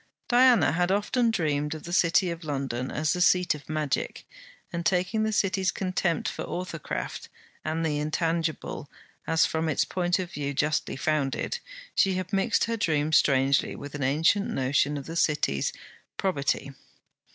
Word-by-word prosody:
Diana 245 - +5
had 175 +3 +1
often 220 +4 +2
dreamed 150 -7 0
of 155 - -9
the 175 - -6
City 175 +1 +3
of 170 0 -7
London 135 -4 -3
as 155 0 0
the 180 - -2
seat 180 0 +4
of 150 -2 -11
magic; 155 -3 -2 0.5
and 170 0 -2
taking 185 +5 +1
the 220 0 +1
City's 190 -2 +1
contempt 185 -3 -1
for - - -4
authorcraft 175 -3 -5 0.3
and 160 +1 -1
the 150 -2 0
intangible 160 -1 -2 0.4
as, 165 0 +4
from 160 0 -1
its 145 - +1
point 175 -1 0
of 180 -2 -4
view, 140 -1 -3
justly 150 +2 0
founded, 150 - -1 0.3
she 190 -1 +3
had 185 0 -4
mixed 195 0 +2
her 230 0 -1
dream 155 -6 +1
strangely 135 -2 +3
with 145 0 -8
an 145 - -5
ancient 160 +9 +2
notion 140 +2 +1
of 140 - -7
the 165 - -7
City's 150 - +1 0.5
probity. 140 -6 -1
160 Hz, 160 wpm, -27 LUFS, 145-185 Hz, 0.5 s, Diana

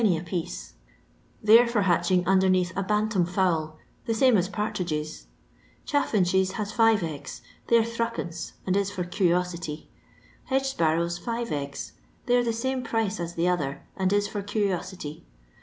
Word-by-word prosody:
a 180 -7 +3
piece; 175 0 -5 0.7
they 215 +2 +8
're 245 - +1
for 230 -4 +1
hatching 175 0 +2
miMnicatk 185 -1 +3
a 195 - 0
bantam 210 -1 +1
fowl, 170 -3 0 0.3
the 225 - +1
same 255 +1 +5
as 185 -2 +2
partridgta. 180 -8 -3 0.6
Chaf 285 -2 +1
finches 190 -2 +2
has 210 0 -3
five 225 -4 +4
eggs; 145 -3 -6 0.2
they're 230 -1 +5
fkL, 230 -7 -4
and 185 - +1
b 200 +1 +3
for 195 -2 -3
cur'osity. 175 -3 -1 0.6
Hedge 270 0 +1
sparrows, 170 -5 0
fira 235 +3 -3
eggs; 140 -1 -4 0.3
thej'rs 245 -1 +3
the 230 - +1
same 260 +3 -1
price 220 -5 -1
as 170 0 -4
the 170 +1 +1
other, 150 -6 -1
and 190 -1 0
Is 205 0 +2
for 205 0 -4
cni^enty. 185 -6 -3
190 Hz, 155 wpm, -26 LUFS, 170-220 Hz, 0.7 s, they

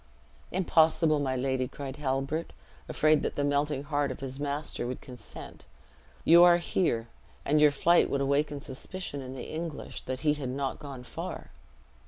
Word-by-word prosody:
"Impossible, 160 -3 +3
my 135 -2 0
lady," 130 0 0
cried 135 0 -7
Halbert, 140 +3 -2 0.4
afraid 155 -1 +3
that - - -2
the 145 - 0
melting 145 0 0
heart 145 -1 0
of 130 - -6
his 135 0 -5
master 145 -3 -3
would 125 - -4
consent: 125 -4 -9 0.6
"you 170 +1 +8
are 175 -1 +7
safe 175 - -7
here; 115 -11 +1 0.4
and 150 +1 +3
your 150 - +8
flight 170 +4 +3
would 140 - 0
awaken 140 +1 0
suspicion 145 +2 -5
in 130 0 -7
the - - -7
English, 160 -1 -5
that 130 0 -4
he 150 -2 +3
had 145 -4 -4
not 135 +1 -3
gone 140 -4 -8
far. - - -7
145 Hz, 170 wpm, -29 LUFS, 135-155 Hz, 0.6 s, you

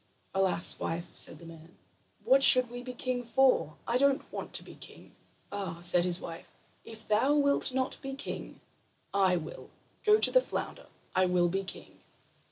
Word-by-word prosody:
"Alas, 190 -2 +1
wife," 170 +1 -4
said - - +1
the 170 - -14
man, 165 +1 -14 0.5
"what 270 +1 +4
should 255 -3 +7
we 245 0 -7
be 250 0 -7
king 250 0 -3
for? 245 - +2
I 240 +2 +1
don't 280 0 +1
want - - -6
to - - 0
be - - -12
king." - - -14 0.4
"Ah," 190 -5 -5
said 175 0 +3
his 180 -1 -2
wife, 165 - -9 0.3
"if 225 -1 -13
thou 230 +8 +2
wilt 280 -2 +3
not 260 0 -3
be 270 -1 -6
king, 275 - -7 0.5
I 190 -2 +3
will. 160 -2 -7 0.3
Go 425 -1 +5
to - - +3
the - - +5
flounder. - - -6 0.3
I 185 0 +3
will 180 -1 +2
be 195 +2 -2
king." 190 - -10
210 Hz, 175 wpm, -30 LUFS, 175-265 Hz, 0.5 s, should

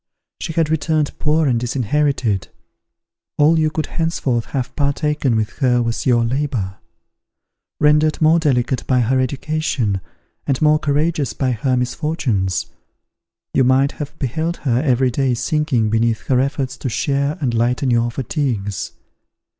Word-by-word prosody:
She 160 - -4
had 160 -1 +1
returned 155 -1 0
poor 155 +1 +2
and 125 -4 +2
disinherited; 125 -3 0 0.9
all 160 +2 +4
you 155 -1 +2
could 155 0 -2
henceforth 140 -8 -1
have 130 -3 -4
partaken 145 -2 0
with 110 -1 0
her 125 -3 +3
was 115 +3 -2
your 120 -2 +3
labour. 120 -7 -2 1.0
Rendered 150 +1 +3
more 160 +1 +4
delicate 130 -4 0
by 125 -2 +3
her 130 +3 +2
education, 130 -6 -1 0.5
and 135 -2 +1
more 155 0 +4
courageous 150 0 0
by 130 -2 0
her 125 +2 0
misfortunes, 125 - -1 0.9
you 130 - +3
might 130 +3 +3
have 150 +1 -7
beheld 160 +6 -2
her 125 -2 +2
every 130 -3 +2
day 130 0 +1
sinking 125 -3 0
beneath 115 0 +1
her 130 -2 +4
efforts 135 -1 -1
to 130 - -3
share 140 +4 0
and 130 -6 -1
lighten 125 +3 +1
your 120 0 +2
fatigues. 120 - -3
135 Hz, 140 wpm, -19 LUFS, 120-150 Hz, 1.0 s, all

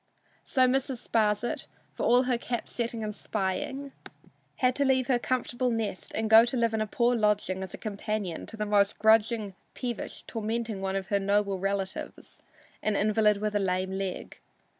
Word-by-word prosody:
So 260 -4 +3
Mrs. 260 -1 -1
Sparsit, 215 +1 0 0.3
for - - -1
all 245 +2 +5
her 250 -2 0
cap 240 -1 -3
setting 230 -1 -3
and 210 0 -3
spying, 265 +9 -3 0.6
had 255 -1 +2
to 285 - +3
leave 260 -2 +3
her 245 -1 +2
comfortable 250 0 -1
nest 220 -6 -3
and 220 0 0
go 220 +1 +9
to 240 +2 -1
live 230 -1 +2
in 220 - 0
a 215 - -1
poor 240 +3 +2
lodging 210 -4 +1
as 190 -1 -5
companion 210 -4 -3
to 225 - -8
the 210 - -1
most 205 -1 +2
grudging, 220 -1 +3 0.2
peevish, 240 -3 -5
tormenting 225 -2 -3
one 195 0 -2
of 190 -1 -3
her 200 - +2
noble 200 -1 +1
relatives, 195 0 -4 0.4
an 215 -1 0
invalid 210 0 +3
with 210 +1 -2
a 205 - +2
lame 185 -1 0
leg. 190 -1 -4
215 Hz, 175 wpm, -28 LUFS, 200-240 Hz, 0.6 s, go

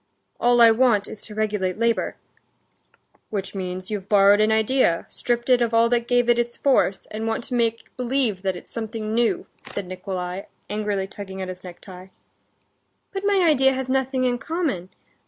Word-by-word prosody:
"All 240 0 +4
I 230 -1 +9
want 225 -3 +3
is 215 - -9
to 210 - -9
regulate 210 -4 -1
labor." 230 0 0 1.1
"Which 200 -3 -4
means, 185 +1 -5
you've 200 -2 -4
borrowed 205 0 +6
an 215 +1 +3
idea, 220 -5 +2
stripped 240 -1 -2
it 250 -2 +4
of 230 -1 +1
all 230 0 +5
that 240 -1 +1
gave 245 -1 +2
it 240 0 +4
its 235 0 -2
force, 260 -8 +2
and 220 +1 -3
want 225 +1 -1
to 250 - -6
make 230 -1 -1
believe 250 -6 0
that 190 -1 -1
it's 175 - -11
something 220 -1 -4
new," 235 0 +1 0.2
said 200 - -5
Nikolay, 185 0 -5 0.2
angrily 210 -2 -1
tugging 190 -1 -8
at 190 -1 -4
his 185 0 -8
necktie. 180 +1 -11 1.1
"But 390 0 -4
my 400 -2 +3
idea 270 -3 +4
has 260 -1 -4
nothing 265 0 0
in 245 -1 0
common...." 285 - -2
220 Hz, 175 wpm, -23 LUFS, 195-245 Hz, 1.1 s, I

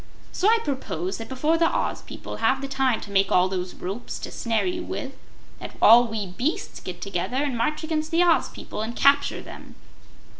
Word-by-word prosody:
So 380 - +1
I 460 - +5
propose 195 - -3
that 225 - -7
before 300 +5 +1
the 330 - +4
Oz - - -1
people - - -8
have 260 +4 +2
the 275 - -3
time 270 -3 +1
to 205 - -9
make 195 -1 +2
all 180 0 +4
those 185 -1 -4
ropes 195 +7 -5
to - - -6
snare 230 -2 -1
you 355 -1 -2
with, 270 -4 -5 0.5
that - - -9
all 235 +2 +8
we 220 -2 -3
beasts 270 - -3
get 180 -1 -8
together 200 +5 -2
and 280 -2 0
march 305 +7 -1
against 315 -1 -2
the 335 +2 +3
Oz 340 -2 +3
people - - -7
and 225 +2 -4
capture 280 0 +3
them. - - -11
255 Hz, 200 wpm, -25 LUFS, 205-305 Hz, 0.5 s, all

